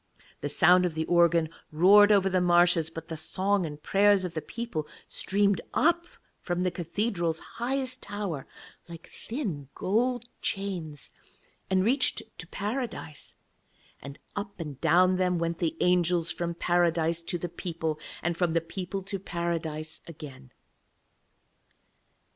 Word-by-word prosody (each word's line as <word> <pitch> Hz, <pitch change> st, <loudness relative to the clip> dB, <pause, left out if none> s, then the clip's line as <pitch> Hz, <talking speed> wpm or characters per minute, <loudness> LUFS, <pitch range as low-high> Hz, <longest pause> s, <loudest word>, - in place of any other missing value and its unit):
The 145 Hz, -, -3 dB
sound 180 Hz, +5 st, +5 dB
of 165 Hz, -, -6 dB
the 160 Hz, 0 st, -1 dB
organ 170 Hz, -1 st, +4 dB, 0.2 s
roared 200 Hz, +6 st, +7 dB
over 195 Hz, -2 st, +5 dB
the 185 Hz, -1 st, +2 dB
marshes, 175 Hz, -2 st, +4 dB
but 165 Hz, 0 st, -8 dB
the 165 Hz, -, -5 dB
song 185 Hz, +3 st, 0 dB
and 150 Hz, -1 st, -8 dB
prayers 200 Hz, -1 st, +4 dB
of 175 Hz, -, -5 dB
the 155 Hz, -, -3 dB
people 230 Hz, -10 st, -5 dB, 0.2 s
streamed 200 Hz, 0 st, +1 dB
up 340 Hz, +2 st, +3 dB, 0.3 s
from 175 Hz, 0 st, -2 dB
the 180 Hz, -, +1 dB
cathedral's 170 Hz, -1 st, -1 dB
highest 255 Hz, +5 st, -3 dB
tower 200 Hz, -9 st, -4 dB, 0.4 s
like 165 Hz, -1 st, -11 dB, 0.2 s
thin 190 Hz, -, -4 dB
gold 240 Hz, +5 st, 0 dB, 0.2 s
chains, 175 Hz, -8 st, -4 dB, 0.6 s
and 190 Hz, 0 st, +2 dB
reached 260 Hz, +6 st, +2 dB, 0.2 s
to -, -, -7 dB
Paradise, 210 Hz, -, -5 dB, 0.7 s
and 140 Hz, 0 st, -9 dB, 0.2 s
up 200 Hz, -2 st, -5 dB
and 150 Hz, -5 st, -6 dB
down 185 Hz, +1 st, +4 dB
them 180 Hz, -1 st, +1 dB
went 170 Hz, 0 st, -2 dB
the 165 Hz, -2 st, -1 dB
angels 175 Hz, -2 st, +3 dB
from 170 Hz, 0 st, -3 dB
Paradise 170 Hz, -1 st, +1 dB
to 170 Hz, +1 st, -3 dB
the 175 Hz, -, -4 dB
people, 165 Hz, -2 st, -4 dB, 0.2 s
and 175 Hz, 0 st, 0 dB
from 170 Hz, -1 st, 0 dB
the 165 Hz, -, +3 dB
people 185 Hz, +3 st, -5 dB
to 195 Hz, +1 st, -4 dB
Paradise 165 Hz, -3 st, -3 dB
again. 140 Hz, -5 st, -10 dB
175 Hz, 140 wpm, -28 LUFS, 165-200 Hz, 0.7 s, roared